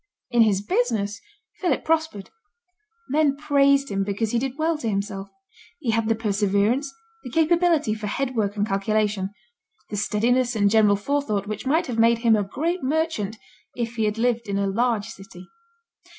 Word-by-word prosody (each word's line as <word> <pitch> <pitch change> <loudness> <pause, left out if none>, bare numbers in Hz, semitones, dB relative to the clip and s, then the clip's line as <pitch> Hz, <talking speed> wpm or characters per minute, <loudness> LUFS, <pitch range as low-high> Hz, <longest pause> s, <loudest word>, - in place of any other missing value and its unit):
In 240 -1 +4
his 200 -3 +3
business 215 -2 -1 0.4
Philip 345 -9 0
prospered. 320 -11 -1 0.8
Men 285 -1 +2
praised 280 -1 +3
him 195 0 -1
because 205 +2 -2
he 235 - +1
did 265 +2 -4
well 320 +1 +1
to 230 - -2
himself. 200 -1 -3 0.5
He 255 -8 -1
had 225 0 0
the 225 - +3
perseverance, 210 +5 0 0.3
the 250 - -7
capability 325 -3 +2
for 215 -1 -5
head 260 +5 -2
work 205 -3 -1
and 205 0 0
calculation, 200 0 0 0.6
the 205 - -3
steadiness 240 +4 +1
and 205 -2 +3
general 210 -2 +5
forethought 210 -2 -1
which 215 +5 -5
might 315 +5 +2
have 235 -3 -3
made 230 +1 +5
him 230 -1 +3
a 210 - +1
great 330 - -2
merchant 265 -7 -1 0.4
if 235 -1 -3
he 220 - +1
had 210 +1 -1
lived 235 -2 0
in 200 - -1
a 200 - 0
large 220 +1 0
city. 185 -2 -11
225 Hz, 170 wpm, -24 LUFS, 205-275 Hz, 0.8 s, general